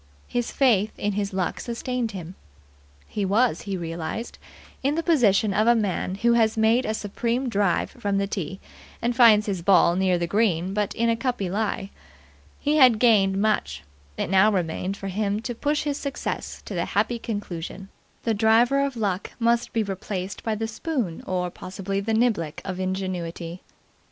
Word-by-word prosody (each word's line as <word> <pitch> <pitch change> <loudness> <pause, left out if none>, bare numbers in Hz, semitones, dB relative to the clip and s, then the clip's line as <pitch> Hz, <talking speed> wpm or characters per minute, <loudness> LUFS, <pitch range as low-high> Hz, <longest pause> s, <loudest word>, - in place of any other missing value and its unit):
His 240 -1 -2
faith 220 -6 +2
in 205 - -1
his 200 0 -2
luck 185 -2 -2
sustained 240 0 -3
him. 180 -4 -7 0.7
He 205 - -3
was, 220 +6 +2
he 195 - -1
realized, 170 +7 -5 0.4
in 280 +3 +1
the 330 - -1
position 220 - +3
of 215 +3 +2
a 240 - +6
man 195 -4 -1
who 235 +4 +2
has 225 -1 +3
made 225 +3 +3
a 215 - 0
supreme 235 +5 -2
drive 200 -6 +1
from 205 -5 -2
the 200 - +1
tee, 190 -2 -4 0.4
and 240 +1 -1
finds 225 -4 +6
his 195 -4 -2
ball 175 -1 +5
near 185 -1 +2
the 175 - -1
green 185 -2 +1
but 210 -1 -1
in 235 0 +1
a 230 - +3
cuppy 230 -6 -2
lie. 200 -1 -2 0.7
He 295 +1 +1
had 255 -6 +7
gained 200 -5 +4
much; 135 - 0 0.3
it - - -2
now 195 +3 +5
remained 185 +1 -2
for 195 - -5
him 205 +1 -1
to 240 +1 -4
push 295 +5 -1
his 285 -1 -1
success 280 -2 -4
to - - -6
the 170 -2 -1
happy 220 +4 0
conclusion. 195 -4 -5 0.3
The 230 - +1
driver 230 +6 +4
of 275 -3 -2
Luck 200 -4 -2
must 235 0 +1
be 225 - +1
replaced 195 -1 -5
by 220 -1 -1
the 225 +1 -2
spoon 225 - -3
or, 180 -1 -1
possibly, 195 +2 -4
the 220 +2 -1
niblick 215 -10 +1
of 185 -1 -4
Ingenuity. 185 -2 -4
205 Hz, 175 wpm, -25 LUFS, 190-235 Hz, 0.7 s, had